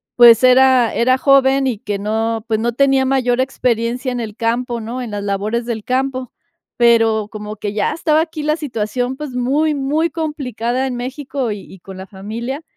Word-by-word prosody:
pues, 235 -1 +7
era 255 -2 +5
era 255 +2 +2
joven 275 0 +4
y 225 -5 -2
que 205 -2 -3
no, 225 +2 -2
pues, 220 -1 0
no 235 +1 -1
tenía 270 0 +3
mayor 255 -2 +1
experiencia 250 0 -1
en 245 - -3
el 215 -2 -6
campo, 235 +1 -1
¿no?, 240 +4 -5
en 240 - -5
las 205 -1 -4
labores 210 +4 -2
del 225 -3 -4
campo. 260 0 -2 0.5
Pero 225 -3 +3
como 210 0 -7
que 205 -1 -4
ya 205 - 0
estaba 315 -1 +2
aquí 320 -2 -5
la 305 +1 +1
situación, 250 -2 -3
pues, 300 -3 -6
muy, 290 +5 +1
muy 295 +4 0
complicada 265 -6 -3
en 250 - -4
México 265 0 -4
y 205 - -5
y 190 - -14
con 190 +1 -11
la 190 - -8
familia. 230 +8 -6
245 Hz, 190 wpm, -18 LUFS, 225-270 Hz, 0.5 s, pues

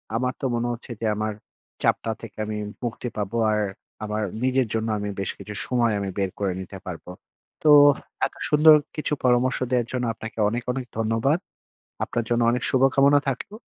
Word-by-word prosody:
আমার 125 +2 0
তো - - -2
মনে 120 +1 -1
হচ্ছে 120 +2 -9
যে, - - -1
আমার 110 0 -1 0.5
চাপটা 115 - +1
থেকে 115 - -10
আমি 105 0 -4 0.3
মুক্তি 120 +1 -3
পাবো, 105 +2 -2
আর 105 0 +1 0.4
আমার 105 +1 -2 0.2
নিজের 130 -1 +2
জন্য 110 0 -1
আমি 105 0 -3
বেশ 95 - -1
কিছু 105 - -8
সময় 120 -3 +1
আমি 100 -1 -3
বের 95 -1 0
করে 100 -2 0
নিতে 95 +1 -8
পারবো। 90 -1 -7 0.5
তো 155 - +5 0.6
এত - - -22
সুন্দর 155 +1 +8 0.2
কিছু 150 -1 -2
পরামর্শ 125 +1 +3
দেওয়ার 120 -2 +2
জন্য 125 -1 -1
আপনাকে 110 +1 -8
অনেক, 120 +2 -3
অনেক 130 -1 -4
ধন্যবাদ। 115 +8 +1 0.7
আপনার 120 - -2
জন্য 120 0 +2
অনেক 120 0 -1
শুভ-কামনা 135 +2 +4
থাকলো। 135 - -5
120 Hz, 175 wpm, -24 LUFS, 110-130 Hz, 0.7 s, সুন্দর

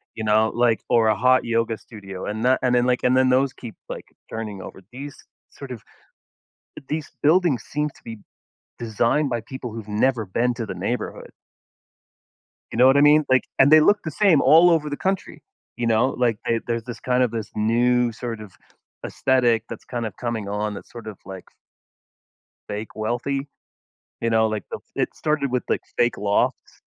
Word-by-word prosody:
you 110 - -4
know, 110 +1 +3
like 120 -2 +2
or 115 -2 +4
a 110 - +3
hot 125 +4 +3
yoga 115 -1 0
studio. 95 -5 -9
And 110 +2 -4
that 130 +1 +4
and 125 -1 +2
then, 120 0 +3
like 125 -1 +2
and 125 0 +3
then 130 0 +4
those 130 +1 +2
keep, 115 -3 -10
like, - - -6 0.3
turning 105 -4 -6
over. 95 - -10
These 140 +3 -8 0.4
sort 135 -2 -10
of 115 - -7 1.1
these 155 -1 -3
buildings 155 - +3
seem 150 +1 -2
to - - -22
be 115 -2 -8 0.6
designed 120 +6 +1
by 120 -2 -2
people 125 -2 -7
who've 110 -2 -8
never 110 +2 +1
been 120 +6 0
to 115 - -4
the 95 - -5
neighborhood. 100 +7 -4 1.4
You - - -4
know 125 - +7
what 135 +1 +6
I - - +5
mean? 150 +1 +6
Like, 130 -1 +4
and 135 +2 +6
they 155 - +9
look 205 +6 +4
the 155 - -3
same 180 -3 +4
all 170 +3 +6
over 150 -3 +1
the 145 - -3
country. 190 0 -3 0.3
You 120 -1 -2
know? 115 +3 +3
Like, 120 -4 0
they 115 -1 +1
there's 115 -1 -2
this 120 -3 -8
kind 125 0 +1
of 125 - +2
this 115 -2 -5
new 120 +2 +2
sort 115 0 -6
of 105 -3 -11 0.5
aesthetic 120 -4 +2
that's - - -8
kinda 115 -4 -4
coming 115 -4 -3
on 105 +1 -2
that's - - -10
sort 115 -2 -10
of, 105 -3 -8
like 95 -1 -10 1.2
fake 105 +2 -5
wealthy. 125 +6 -2 0.7
You 115 - 0
know? 110 0 +3
Like, 110 -3 -3
the - - -4 0.2
it - - -2
started 150 -3 0
with, 125 0 -1
like, - - +1 0.2
fake 120 -1 +2
lofts, 100 0 0
120 Hz, 190 wpm, -23 LUFS, 110-130 Hz, 1.4 s, they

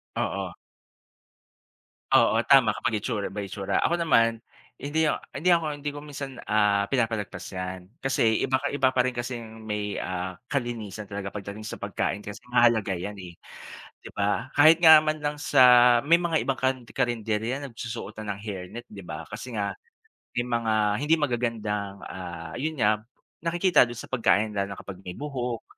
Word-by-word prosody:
Oo. - - -2 1.6
Oo, 110 - +5
tama 135 -5 +6
kapag 110 -2 -1
itsura 105 -3 -3
by 100 -2 -5
itsura. 100 -2 -1
Ako 170 - +2
naman, 115 -9 +3 0.4
hindi 155 +2 0
ak - - -3
hindi 160 +7 0
ako, 170 -2 +4
hindi 145 0 -4
ko 145 0 -7
minsan, 140 -3 -7
ah, 105 -1 +2
pinapalagpas 110 -4 -1
'yan. 90 -1 -6
Kasi 120 -6 +1
iba 130 0 +1
ka - - -1
iba 135 -2 +2
pa 125 - +4
rin 125 0 -1
kasing 115 -2 -6
may, 105 -1 -3
ah, 90 0 -4
kalinisan 110 -7 -4
talaga 100 -1 -5
pagdating 105 +1 -7
sa - - -7
pagkain 100 - -2
kasi 105 +3 -9
mahalaga 115 -5 +4
'yan 100 +3 -5
eh, 90 -2 -9 0.7
'di - - -9
ba? 105 +5 0
Kahit 155 +3 +7
nga 160 -1 +10
man 155 0 -1
lang 150 0 -2
sa 140 -2 +3 0.4
may 170 +2 +6
mga 165 -2 +1
ibang 135 -1 -1
kan 130 0 +2
karenderya 120 +1 -1
nagsusuot 115 -2 -6
na 105 -1 -3
ng - - -13
hair 100 -4 -5
net 120 +1 -7
'di 100 -1 -9
ba 80 0 -6
kasi 125 -3 -7
nga, 100 -1 -1 0.6
may 120 - +1
mga 115 -2 0 0.3
hindi 150 +3 +3
magagandang, 110 -7 -2
ah, 85 -3 -7
yun 155 +1 -2
nga, 105 -1 +3 0.4
nakikita 175 -2 +4
dun 120 - -7
sa - - -9
pagkain 110 -3 +2
lalo 100 0 -1
na - - -17
kapag 95 -1 -9
may 90 -1 -7
buhok, 125 -5 -4
115 Hz, 170 wpm, -26 LUFS, 100-135 Hz, 1.6 s, nga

